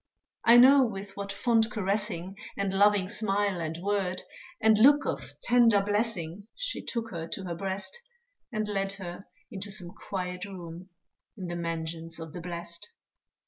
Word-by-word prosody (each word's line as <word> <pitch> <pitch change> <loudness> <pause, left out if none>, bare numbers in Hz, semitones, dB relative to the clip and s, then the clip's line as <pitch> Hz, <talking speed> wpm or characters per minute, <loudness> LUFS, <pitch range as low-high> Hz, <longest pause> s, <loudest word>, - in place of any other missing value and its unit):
I 235 +1 +8
know 265 +3 +8
with 200 -4 -4
what 200 0 -4
fond 225 +2 +2
caressing, 200 -3 -2 0.2
And 195 -1 -1
loving 200 -1 +4
smile 205 -3 0
and 160 0 -3
word, 195 -2 0 0.4
And 220 0 +5
look 285 +5 +7
of - - -4
tender 235 -3 +5
blessing, 205 -3 -1
She - - -3
took 230 -2 -3
her 165 -2 -4
to 190 - -4
her 175 -2 -3
breast, 195 - -3 0.5
And 215 -2 -1
led 195 -1 -1
her 190 -1 -8 0.2
into 200 +1 -6
some 190 -4 +1
quiet 180 0 -5
room, 180 -2 -9 0.5
In 190 - -5
the 175 - -3
mansions 165 0 -4
of 160 -1 -8
the 175 - -6
blest. 170 +2 -6
195 Hz, 155 wpm, -29 LUFS, 175-215 Hz, 0.5 s, I